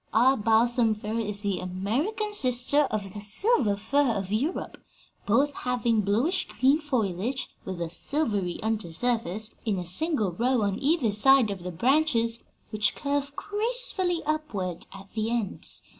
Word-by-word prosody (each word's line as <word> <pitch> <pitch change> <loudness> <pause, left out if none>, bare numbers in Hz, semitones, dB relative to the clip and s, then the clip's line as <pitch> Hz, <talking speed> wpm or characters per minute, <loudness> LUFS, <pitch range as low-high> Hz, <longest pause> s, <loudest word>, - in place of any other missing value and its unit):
Our 255 +4 +5
balsam 225 0 +2
fir 215 +2 -4
is 210 -2 -2
the 200 -3 -2
American 245 - -2
sister 265 -3 +3
of 200 -3 -4
the 210 - -7
silver 215 - +3
fir 255 +4 +1
of 195 -1 -4
Europe, 270 - -3 0.4
both 270 +7 +2
having 240 -4 0
bluish 240 - 0
green 270 +4 +2
foliage 250 - -2
with 185 -2 -5
a 170 - -2
silvery 205 - -1
under 215 -5 -2
surface, 220 +1 -1
in 215 -4 -1
a 180 - -4
single 215 - +1
row 240 +5 0
on 200 +1 -1
either 280 -6 +1
side 240 +2 +5
of 195 -3 -6
the 180 - -5
branches, 235 - +1 0.3
which 215 -1 +1
curve 285 0 -2
gracefully 415 -5 +1
upward 215 - -3
at 195 0 -12
the 220 0 -2
ends. 230 -5 -3
230 Hz, 150 wpm, -26 LUFS, 205-285 Hz, 0.4 s, Our